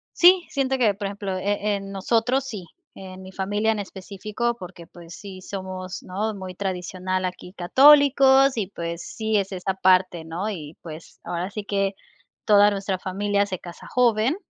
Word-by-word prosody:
Sí, 355 0 +6
siento 265 -1 0
que, 225 -5 +3
por 200 -1 -4
ejemplo, 195 -2 -4
eh, 205 +2 0
en 195 0 -6
nosotros 230 +7 +1
sí, 210 -9 -6 0.3
en 190 -1 -10
mi 190 0 -10
familia 205 +3 0
en 215 - -2
específico, 205 +4 -4
porque, 180 -3 -10
pues, 170 -1 -13
sí 195 -2 -10
somos, 185 -1 -6
¿no? 210 +4 -3
Muy 185 -2 -8
tradicional, 185 0 -3
aquí 180 0 -6
católicos 270 +4 +6
y, 200 -4 -1
pues, 170 -3 -5
sí 220 -1 -1
es 195 0 -1
esta 190 +1 -3
parte, 185 -3 +3
¿no? 175 +6 -3
Y, 155 -6 -7
pues, 160 0 -11
ahora 175 +3 -4
sí 210 - -5
que 195 -1 -1 0.5
toda 205 -1 +6
nuestra 195 -1 -2
familia 200 +2 0
se 185 -3 -5
casa 175 -1 -11
joven. 240 +3 +2
195 Hz, 170 wpm, -24 LUFS, 185-215 Hz, 0.5 s, Sí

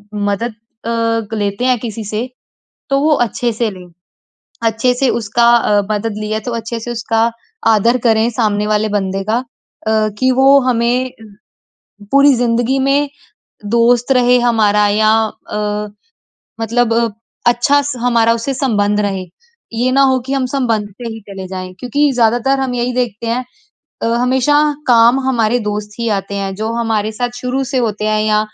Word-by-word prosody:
मदद 205 +3 -1 0.3
अ, 230 -1 -1
लेते 205 +4 -2
हैं 255 -1 +3
किसी 225 -1 -5
से, 215 +5 -3 0.6
तो 275 - +3
वो 305 +2 +2 0.2
अच्छे 240 +2 -2
से 225 0 -1
लें। 185 -2 -11 0.8
अच्छे 225 +3 +1
से 260 +1 +1
उसका 235 +1 0
अ, 210 -3 +2
मदद 210 +1 -2
ली 215 0 -5
है, 215 - -1
तो 245 +3 -5
अच्छे 230 +1 -4
से 240 +2 -6
उसका 230 0 0 0.4
आदर 225 +3 +3
करें 225 +1 +3
सामने 210 -3 0
वाले 215 0 +1
बंदे 195 -2 -2
का 225 - +2
अ, 220 -3 -3
कि 260 0 +2
वो 270 +2 +5
हमें 245 +2 +1 1.0
पूरी 280 0 +6
ज़िंदगी 240 +2 +1
में 275 +2 +2 0.7
दोस्त 240 +2 +3
रहे 250 0 +4
हमारा 215 -4 +3
या 215 +1 +3 0.4
अ, 210 0 -2 0.7
मतलब 230 +1 +1 0.5
अच्छा 260 +5 +3
स 285 +1 -3
हमारा 230 -2 +3
उससे 230 +4 -3
संबंध 210 -6 0
रहे। 195 -2 -2 0.5
ये 245 +3 0
ना 275 +1 +3
हो 260 - +1
कि 270 - -2
हम 270 -2 0
संबंध 230 -7 0
से 235 +4 -8
ही 225 - -8
चले 190 -1 -7
जाएँ, 185 -1 -6
क्योंकि 285 +4 +1
ज़्यादातर 245 +3 +2
हम 260 -2 -2
यही 245 +1 -1
देखते 235 -3 -2
हैं। 240 +2 -1 0.6
अ, - - +1
हमेशा 255 +3 +2 0.3
काम 240 +2 +5
हमारे 235 -2 +2
दोस्त 210 0 -3
ही 235 - -1
आते 195 +1 -6
हैं 195 -1 -3
जो 220 +3 -3
हमारे 220 -2 -1
साथ 245 +3 -2
शुरू 255 +2 -2
से 265 +1 -2
होते 215 -3 -2
हैं 215 0 +1
या 215 0 +2
230 Hz, 165 wpm, -16 LUFS, 210-250 Hz, 1.0 s, पूरी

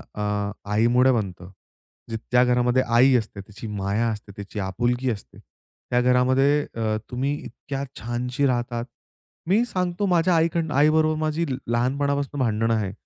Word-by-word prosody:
अ, 105 0 -1 0.2
आईमुळे 120 +4 +4
बनतं. 95 -6 -3 0.6
जी 115 - -2
त्या 125 0 +5
घरामध्ये 125 +1 +2
आई 130 +2 +6
असते, 110 -4 -2
त्याची 105 +3 -10
माया 105 +2 -1
असते, 105 -2 -6
तिची 100 +1 -7
आपुलकी 120 +7 -1
असते. 100 - -8
त्या 125 0 -5
घरामध्ये 130 +4 +3
अ, 110 -1 0
तुम्ही 135 +4 -1
इतक्या 135 0 -6 0.2
छानशी 125 +4 -2
राहतात. 120 -1 -1 0.6
मी 210 +6 +3
सांगतो 185 -2 -2
माझ्या 175 -1 +3
आई 165 +1 +4
कडना 160 -4 -1
आई 150 +2 +5
बरोबर 155 0 +2
माझी 155 +2 0 0.2
लहानपणापासून 140 +4 0
भांडण 115 -2 +1
आहे 105 -4 0
125 Hz, 145 wpm, -24 LUFS, 110-140 Hz, 0.6 s, आई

